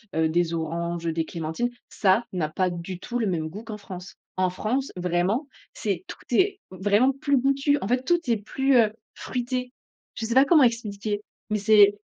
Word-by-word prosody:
heu, 160 0 +2
des 170 0 +1
oranges, 170 +1 -3
heu, - - +1
des 165 -1 -1
clémentines. 165 +10 -2 0.2
Ça 205 +4 +2
n'a 155 -4 -1
pas 180 +2 0
du 175 +1 -6
tout 245 +4 -3
le 220 - +1
même 160 -3 -1
goût 210 +7 -8
qu'en 215 -2 -7
France! 185 -2 -9 0.2
En 185 0 +2
France, 245 +9 -2
vraiment, 180 - 0 0.3
c'est 195 -4 -2
tout - - -8
est 390 +9 +3
vraiment 205 +7 +3
plus 280 0 +1
goûtu, 275 +2 +2
en 195 - -2
fait, 250 +2 +1
tout 345 +5 +3
est 225 - +3
plus, 265 +6 +1
heu, 220 -3 +5 0.2
fruité. 250 0 -3 0.4
Je 225 - -3
sais 230 - -1
pas 265 +2 +6
comment 305 -3 +6
expliquer, 210 -3 -1 0.3
mais 210 - +1
c'est 205 -1 +6
210 Hz, 195 wpm, -25 LUFS, 180-250 Hz, 0.4 s, pas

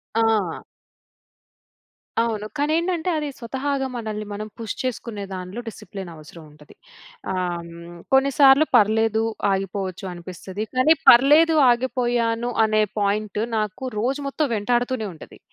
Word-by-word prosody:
ఆ! 220 -6 +1 1.6
అవును. 225 -2 -1
కానేంటంటే 330 +4 0
అది, 300 -1 -2
స్వతహాగా 270 +2 -2
మనల్ని 215 -2 -4
మనం 210 +1 -5
పుష్ 225 -2 -4
చేసుకునే 235 -4 -4
దాంట్లో, 185 +5 -6
డిసిప్లిన్ 195 -4 -8
అవసరం 155 +1 -13
ఉంటది. 150 0 -18 0.6
ఆహ్, 175 -2 -2
హ్మ్, 170 +1 -11 0.2
కొన్ని 270 +1 +4
సార్లు 275 +2 +7
"పర్లేదు, 220 0 +3 0.3
ఆగిపోవచ్చు" 195 0 -3
అనిపిస్తది. 185 +4 -7
కానీ 255 +6 +5
పర్లేదు 300 +6 +6 0.2
ఆగిపోయాను, 240 -1 0 0.2
అనే 215 0 +2 0.2
పాయింట్ 205 0 -1 0.2
నాకు 215 +2 -3 0.2
రోజు 265 +5 -1
మొత్తం 290 +2 -1
వెంటాడుతూనే 240 +1 0
ఉంటది. 155 - -14
225 Hz, 115 wpm, -23 LUFS, 195-260 Hz, 1.6 s, సార్లు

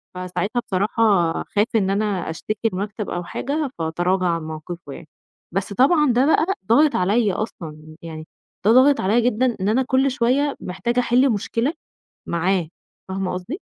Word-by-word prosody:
فساعتها 185 +5 -2
بصراحة 200 -2 +2
خاف 205 +1 +1
إن 195 -4 +2
أنا 200 -3 -1
أشتكي 215 +7 -3
المكتب 205 +2 -4
أو 175 - -3
حاجة، 285 - -3
فتراجع 175 +3 0
عن 165 -1 -1
موقفُه 155 -1 -7
يعني، 165 - -11 0.5
بس 195 +2 -2
طبعًا 290 - +4
ده 250 +3 +3
بقى 315 - +4 0.2
ضاغط 290 +7 +4
عليَّ 205 +2 +2
أصلًا، 155 -7 -6
يعني 160 -1 -8 0.4
ده 215 - +6
ضاغط 265 +4 +5
عليَّ 215 +6 +2
جدًا 245 +1 +1
إن 195 - +1
أنا 250 +5 +2
كُلّ 265 +2 +2
شوية 265 +3 +1
محتاجة 235 +7 -2
أحِلّ 250 +2 +3
مشكلة 230 +6 -1 0.6
معاه، 175 0 0 0.4
فاهمة 190 0 -2
قصدي؟ 190 - -6
205 Hz, 155 wpm, -22 LUFS, 180-245 Hz, 0.6 s, ده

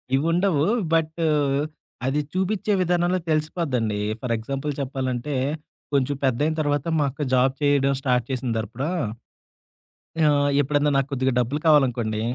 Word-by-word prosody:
ఇవిండవు. 165 +2 +2 0.3
But 160 0 +1 0.9
అది 135 +3 +1
చూపించే 190 +3 0
విధానంలో 175 +1 +1
తెలిసిపోద్దండి. 145 - 0 0.2
ఫర్ 125 -2 -1
ఎగ్జాంపుల్ 135 +6 -3
చెప్పాలంటే, 130 +1 -3 0.6
కొంచెం 140 +1 +1
పెద్దయిన 140 +5 +1
తర్వాత 145 -2 0
మా - - +3
అక్క 145 - -9
జాబ్ 130 +1 +3
చేయడం 140 -1 +3
స్టార్ట్ 125 -3 +1
చేసిన 125 -1 -2
తరపుడా"" 115 +5 -4 1.4
ఆహ్, 145 -1 +3
ఎప్పుడైనా 145 +1 +1
నాకు 135 -1 +1
కొద్దిగా 130 0 +1
డబ్బులు 125 +5 -1
కావాలనుకోండి, 120 -7 +3
140 Hz, 120 wpm, -24 LUFS, 130-155 Hz, 1.4 s, మా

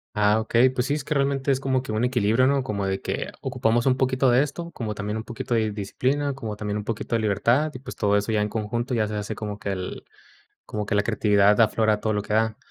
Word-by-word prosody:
Ah, 105 +1 +3
okey, 120 +3 +4
pues, 125 -1 -1
sí, 140 - 0
es 150 - -2
que 150 +1 -2
realmente 140 0 0
es 135 - +1
como 130 -1 0
que 130 - -6
un 110 +2 0
equilibrio, 120 -1 +2
¿no? 140 +1 +3
Como 105 -6 -3
de 95 0 -2
que - - -3
ocupamos 120 +3 +1
un 130 - +3
poquito 130 0 +2
de 125 +3 +5
esto, 170 +4 -6
como 115 -9 -4
también 105 +1 -4
un 110 - -4
poquito 120 +1 -3
de 110 -2 +1
disciplina, 130 +8 -1
como 110 -6 -5
también 105 0 -3
un 105 - -4
poquito 115 +1 -3
de 115 - +1
libertad, 120 +9 +2
y, 130 - -8
pues, 130 0 -9
todo 100 0 +1
eso 105 +2 0
ya 105 -1 +2
en 105 - +1
conjunto 115 +4 -3
ya 110 -3 +1
se 105 - -4
hace 105 +1 -3
como 105 -1 -5
que 100 -1 -4
el 95 -1 -5 0.6
como 105 -1 -4
que 105 - -1
la 100 - +3
creatividad 105 -1 +3
aflora 110 -1 +3
todo 110 0 0
lo 105 -1 -1
que 105 - -6
da. 110 0 +1
110 Hz, 260 wpm, -24 LUFS, 105-130 Hz, 0.6 s, de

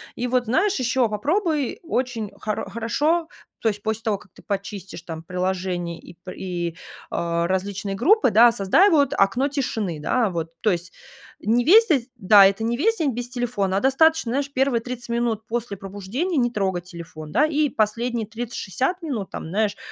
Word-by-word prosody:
И 245 - -2
вот 250 0 +1
знаешь, 385 - +2
еще 255 0 +2
попробуй 300 - -1
очень 245 -9 -2
хоро 210 -2 -3
хорошо, 295 - 0 0.3
то 225 - +2
есть 205 -1 -4
после 220 +1 -2
того, 215 -3 0
как 190 -2 -20
ты - - -16
почистишь 200 -3 -5
там 165 -2 -7
приложения 180 -1 -2
и 170 - -14
пр 185 - -6
и, 175 -3 -4 0.4
э, 170 0 -1
различные 195 +2 -2
группы, 350 - +4
да, 230 +2 +7
создай, 230 - +4
вот, 285 -5 +3
окно 240 +8 +3
тишины, 220 - -2
да, 230 +7 +1
вот. 165 -2 -3
То 215 - +2
есть 175 0 -3 0.5
не 230 +4 +2
весь 435 - +7
де 270 -8 +2
да, 200 +1 +7
это 200 +3 +2
не 235 +1 0
весь 450 - +1
день 295 -7 0
без 245 +1 -4
телефона, 240 -7 -1
а - - +3
достаточно, 270 +1 +3
знаешь, 280 +2 -1
первые 260 -3 +1
30 245 0 -6
минут 235 -2 -1
после 230 -3 -3
пробуждения 205 - -4
не 240 -2 +2
трогать 190 -5 -1
телефон, 165 -3 -10
да, 280 +8 +4
и 305 -1 +1
последние 230 +1 -1
30-60 245 - -3
минут 255 - -4
там, 160 - -6
знаешь, 210 +2 0
225 Hz, 180 wpm, -23 LUFS, 195-260 Hz, 0.5 s, да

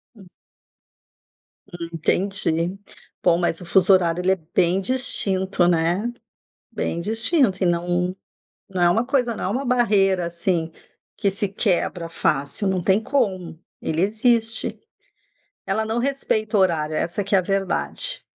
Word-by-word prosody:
Hum. 195 -4 -15 1.4
Hum, 175 -3 -7
entendi. 175 +1 -1 0.5
Bom, 170 -1 +4
mas 175 -1 -1
o - - -8
fuso 190 +2 +4
horário 175 -1 +2
ele 190 +1 +2
é - - +3 0.2
bem 180 +1 +3
distinto, 190 -6 +1
né? 175 +7 +1 0.6
Bem 170 - -3
distinto 225 - +1
e - - +3
não 175 +1 0 0.6
não 185 -2 -1
é 175 - +5
uma 225 +6 +2
coisa 250 -4 +1
não - - -5
é - - 0
uma 255 +7 -2
barreira, 200 -8 +2
assim, 170 -1 -1 0.5
que 200 -2 +1
se 200 +1 -2
quebra 180 -4 -1
fácil. 155 +3 -1
Não 185 -2 0
tem 195 +3 +3
como. 185 - -1 0.2
Ele 160 +2 -1
existe. 225 +2 +1 0.9
Ela 220 - 0
não 220 +2 -2
respeita 235 -5 -1
o - - +4
horário. 155 -4 +1
Essa 175 +5 -2
que 200 - -1
é - - +7
a - - +1
verdade. 195 - -2
190 Hz, 145 wpm, -22 LUFS, 175-215 Hz, 1.4 s, é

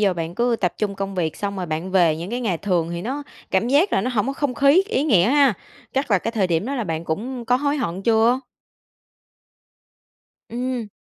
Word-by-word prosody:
giờ 195 -3 +3
bạn 165 0 -4
cứ 240 +1 +1
tập 180 -3 0
trung 205 -2 -1
công 195 0 -4
việc 165 -4 -1
xong 200 -1 -3
rồi 180 -2 -3
bạn 160 +4 -3
về 170 -5 +3
những 175 +5 -6
cái 245 +1 -2
ngày 190 -9 -1
thường 175 -5 0
thì 170 +1 -4
nó 275 +5 -3 0.3
cảm 190 +5 +1
giác 305 +9 +3
là - - +3
nó 250 +6 -1
hổng 225 -1 0
có 275 - -1
không 275 -2 -2
khí, 280 +9 +5
ý 265 - +1
nghĩa 205 - +4
ha. 280 -4 +5 0.4
Chắc 270 -3 -1
là 200 - +5
cái 230 - -3
thời 205 -5 +1
điểm 170 +5 0
đó 280 - -2
là 235 -5 -2
bạn 165 -1 -3
cũng 235 +9 -4
có 250 +2 +3
hối 285 +2 0
hận 190 -7 -3
chưa? 230 +3 +3 2.1
Ừm. 245 -2 -3
215 Hz, 230 wpm, -22 LUFS, 180-255 Hz, 2.1 s, khí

